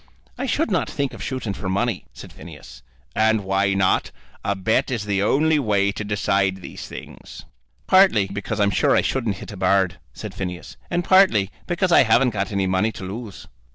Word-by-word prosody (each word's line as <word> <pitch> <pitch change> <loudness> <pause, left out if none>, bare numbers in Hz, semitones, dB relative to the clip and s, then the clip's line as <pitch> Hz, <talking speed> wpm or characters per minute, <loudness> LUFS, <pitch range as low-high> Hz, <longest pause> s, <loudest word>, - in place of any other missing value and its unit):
"I 270 - -4
should 275 0 0
not 185 - 0
think 140 -3 -2
of - - -9
shooting 130 -6 -3
for 95 0 -5
money," 100 +1 -1
said - - -12
Phineas. - - -12 0.3
"And 110 -1 +2
why 95 +1 +1
not? 95 -1 +2 0.3
A 100 - 0
bet 100 +4 0
is 115 -5 -3
the 100 -1 0
only 155 +8 +2
way 100 -5 +1
to 100 - -5
decide 100 -2 0
these - - -8
things." - - -11 0.4
"Partly 185 - +5
because 100 +2 -5
I'm 100 -1 +3
sure 95 - +2
I - - +4
shouldn't 115 -7 -1
hit - - -9
a 100 - -9
bird," 95 -1 +1
said - - -8
Phineas, 90 -2 -6
"and 175 0 0
partly 180 - +4 0.2
because 175 +1 0
I - - +7
haven't 125 +1 +3
got 100 -2 -3
any 100 -1 0
money 95 +4 +1
to - - -9
lose." 95 -3 -7
105 Hz, 190 wpm, -22 LUFS, 95-125 Hz, 0.4 s, I